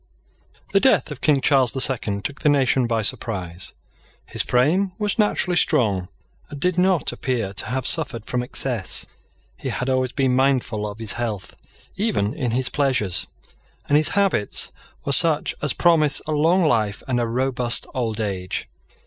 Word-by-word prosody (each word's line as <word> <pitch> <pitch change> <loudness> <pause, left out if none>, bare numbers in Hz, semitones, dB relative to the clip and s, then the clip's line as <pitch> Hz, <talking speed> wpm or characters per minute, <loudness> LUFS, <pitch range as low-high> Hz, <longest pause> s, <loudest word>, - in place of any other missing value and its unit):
THE 195 - +5
death 260 - +3
of 145 - -8
King 145 -3 +3
Charles 135 -3 +3
the 135 - -3
Second 105 -7 0
took 145 - -4
the 150 - +3
nation 130 -3 +2
by 115 -1 -1
surprise. 90 -5 -2 0.5
His - - -1
frame 175 +10 +1
was 210 0 -2
naturally 190 -4 +1
strong, 100 - +1 0.4
and 145 - -8
did 180 +2 0
not 180 -6 +2
appear 115 -7 -3
to - - 0
have 130 +2 -3
suffered 115 -3 0
from 125 - -2
excess. 125 -4 -1 0.5
He - - -5
had 125 - -3
always 130 -1 0
been 130 -2 +1
mindful 125 -6 0
of 100 - -9
his 110 -3 -1
health 110 -5 -4 0.4
even 195 - 0
in 140 -6 -3
his 125 +2 -1
pleasures; 130 -10 0 0.6
and 145 - +2
his 150 0 +5
habits 195 - +1 0.3
were 140 - -1
such 160 +1 +4
as 150 -4 0
promise 160 -4 +3
a 155 - -4
long 165 +5 +2
life 110 -7 0
and 125 -2 0
a 120 - -1
robust 125 0 0
old 115 -4 -3
age. 95 -4 -3
130 Hz, 165 wpm, -22 LUFS, 110-150 Hz, 0.6 s, THE